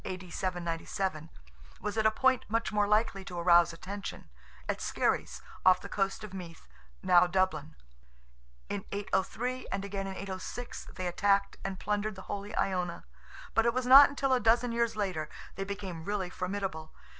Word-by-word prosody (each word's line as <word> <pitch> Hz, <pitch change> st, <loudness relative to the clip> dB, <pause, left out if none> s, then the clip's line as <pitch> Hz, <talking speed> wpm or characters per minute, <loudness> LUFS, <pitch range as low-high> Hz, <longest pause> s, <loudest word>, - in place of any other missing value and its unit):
D. 185 Hz, -1 st, -6 dB
797) 170 Hz, -1 st, -3 dB, 0.5 s
was 210 Hz, 0 st, -3 dB
at 220 Hz, -1 st, +3 dB
a -, -, +6 dB
point 260 Hz, +3 st, +2 dB
much 230 Hz, +2 st, 0 dB
more 210 Hz, -1 st, +2 dB
likely 210 Hz, -2 st, +2 dB
to 180 Hz, -2 st, -7 dB
arouse 170 Hz, 0 st, +5 dB
attention—at 165 Hz, -, -7 dB
Skerries, -, -, -1 dB, 0.2 s
off 185 Hz, 0 st, +6 dB
the -, -, -8 dB
coast 195 Hz, +1 st, -1 dB
of 210 Hz, -3 st, -8 dB
Meath 175 Hz, -4 st, -9 dB, 0.4 s
(now 180 Hz, -1 st, +6 dB
Dublin); 175 Hz, -4 st, 0 dB, 0.9 s
in 200 Hz, -1 st, -3 dB
803, 220 Hz, +5 st, -2 dB
and 200 Hz, -, -2 dB
again 195 Hz, -1 st, -4 dB
in 190 Hz, -, -5 dB
806, 195 Hz, +5 st, -6 dB
they 185 Hz, -, -4 dB
attacked 200 Hz, +2 st, +1 dB
and 195 Hz, -1 st, -4 dB
plundered 210 Hz, 0 st, -1 dB
the 190 Hz, -, -9 dB
holy 205 Hz, +2 st, -5 dB
Iona; 180 Hz, -3 st, -1 dB, 0.5 s
but 225 Hz, +1 st, +3 dB
it 235 Hz, -, +2 dB
was 255 Hz, -1 st, 0 dB
not 270 Hz, +3 st, +10 dB
until 275 Hz, -1 st, 0 dB
a 255 Hz, -, +4 dB
dozen 235 Hz, +1 st, +3 dB
years 235 Hz, -1 st, 0 dB
later 185 Hz, -7 st, -2 dB, 0.2 s
they 195 Hz, -, -4 dB
became 190 Hz, -4 st, -5 dB
really 190 Hz, -1 st, -2 dB
formidable. 185 Hz, -4 st, -4 dB
195 Hz, 160 wpm, -31 LUFS, 180-215 Hz, 0.9 s, not